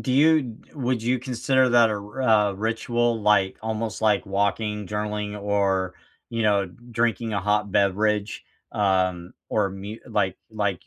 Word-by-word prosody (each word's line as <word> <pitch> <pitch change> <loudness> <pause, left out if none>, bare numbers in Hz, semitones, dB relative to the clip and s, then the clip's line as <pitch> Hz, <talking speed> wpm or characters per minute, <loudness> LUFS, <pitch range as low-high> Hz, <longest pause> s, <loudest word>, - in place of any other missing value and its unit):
Do 130 - -2
you 145 -5 +3 0.2
would 125 -4 -1
you 125 +2 +1
consider 130 +1 +1
that 120 -2 +5
a - - 0
r 105 +5 -7 0.3
a - - -6
ritual, 115 +2 0
like, 105 -2 +2
almost 110 -2 -3
like 105 -2 +2
walking, 100 +1 -1
journaling, 105 0 -3
or, 100 -2 0 0.4
you 115 -1 -1
know, 100 -2 +2
drinking 115 +3 -2
a 100 - 0
hot 105 0 0
beverage, 105 +1 +1 0.3
um, 95 -3 0 0.2
or 105 -2 +1
mu 100 +3 -7
like 95 -3 0
like, 100 -5 -2
105 Hz, 150 wpm, -24 LUFS, 100-115 Hz, 0.4 s, that